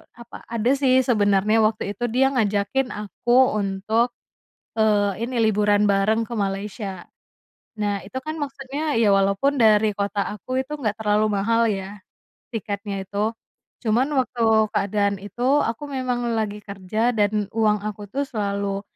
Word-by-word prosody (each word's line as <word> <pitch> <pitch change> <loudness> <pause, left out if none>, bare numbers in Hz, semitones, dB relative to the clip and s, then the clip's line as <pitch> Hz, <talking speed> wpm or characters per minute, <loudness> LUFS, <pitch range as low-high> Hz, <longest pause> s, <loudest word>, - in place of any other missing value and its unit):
apa 235 0 -11
ada 235 +2 0
sih 260 -2 +4
sebenarnya 210 -1 +3
waktu 215 -2 0
itu 240 - -6
dia 260 +3 +3
ngajakin 215 +3 0
aku 240 +4 +2
untuk, 210 +5 0 0.7
eee, 205 -1 +2
ini, 255 - -5
liburan 210 -1 +3
bareng 210 +3 +2
ke 235 - -5
Malaysia. 195 -1 -4 0.7
Nah, 205 -1 0
itu 260 - -7
kan 310 +1 -4
maksudnya, 280 +1 -3
ya, 215 -3 +4
walaupun 200 +9 +2
dari 215 -1 +5
kota 200 0 -1
aku 255 +5 -3
itu 300 - -8
nggak 215 -4 -2
terlalu 210 0 +2
mahal, 230 +3 +2
ya, 195 +1 -5 0.5
tiketnya 200 -2 -4
itu, 205 +3 -1 0.5
cuman 235 +5 +2
waktu 245 -2 0 0.3
keadaan 200 0 0
itu 205 +5 -6 0.2
aku 230 +6 -3
memang 250 -3 -2
lagi 210 -1 -2
kerja 210 +5 -1
dan 210 0 +1
uang 210 -2 +2
aku 210 -1 -5
tuh 280 +4 -1
selalu 200 -3 -2
215 Hz, 140 wpm, -23 LUFS, 200-240 Hz, 0.7 s, dari